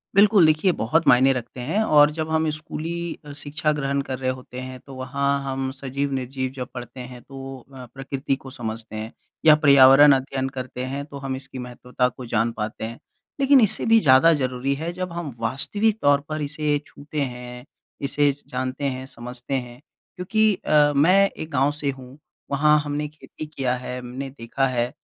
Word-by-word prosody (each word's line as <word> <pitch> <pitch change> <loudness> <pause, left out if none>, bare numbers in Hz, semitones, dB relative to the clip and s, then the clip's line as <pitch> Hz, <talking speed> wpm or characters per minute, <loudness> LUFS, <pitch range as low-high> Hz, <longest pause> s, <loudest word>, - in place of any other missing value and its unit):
बिल्कुल, 200 -3 +6
देखिए, 155 +4 +3
बहुत 160 +5 0
मायने 130 +2 +6
रखते 125 0 -6
हैं, 165 - 0
और 150 -5 +5
जब 160 0 -4
हम 160 0 +1
स्कूली 165 +2 -5
अ, 145 - -9
शिक्षा 150 +1 -2
ग्रहण 140 -1 -1
कर 130 -2 -5
रहे 130 -1 -1
होते 125 0 -9
हैं, 130 0 -7
तो 135 - -13
वहाँ 140 +2 -1
हम 135 -1 -3
सजीव-निर्जीव 135 -1 -3
जब 125 -1 -5
पढ़ते 125 +1 -8
हैं, 125 -1 -9
तो 135 -1 -9 0.2
अ, 130 -1 -9
प्रकृति 135 0 -3
को 135 0 -12
समझते 110 -3 -6
हैं, 110 +1 -5 0.3
या 155 -1 +9
पर्यावरण 140 -1 +7
अध्ययन 135 0 -2
करते 130 -1 -6
हैं 140 +2 -4
तो 140 -1 -10
हम 135 -1 -4
इसकी 130 -1 -9
महत्वता 125 +1 -2
को 125 0 -10
जान 115 0 0
पाते 110 0 -5
हैं। 115 +2 -8 0.4
लेकिन 275 -1 +5
इससे 215 0 +6
भी 225 0 +5
ज़्यादा 145 +1 +6
ज़रूरी 130 -1 -1
है 160 +4 -4
जब 185 -1 -5
हम 165 -7 -5
वास्तविक 205 - 0
तौर 140 0 +4
पर 155 0 -3
इसे 150 0 -1
छूते 150 +1 -6
हैं, 125 -1 -6 0.4
इसे 145 +1 +2
स 145 - -13
जानते 130 +2 -4
हैं, 130 -1 -3
समझते 125 0 -7
हैं, 125 -2 -4 0.4
क्योंकि 215 +4 +2
अ, 150 -1 +4
मैं 185 +7 +5
एक 155 - -9
गाँव 140 +1 +2
से 145 -1 -3
हूँ, 130 +1 -13 0.3
वहाँ 150 +2 +4
हमने 150 +1 -2
खेती 155 +1 -10
किया 135 -4 -2
है, 125 0 -6
हमने 130 +2 -6
देखा 135 +1 -2
है, 120 -1 -1
135 Hz, 185 wpm, -23 LUFS, 130-150 Hz, 0.4 s, या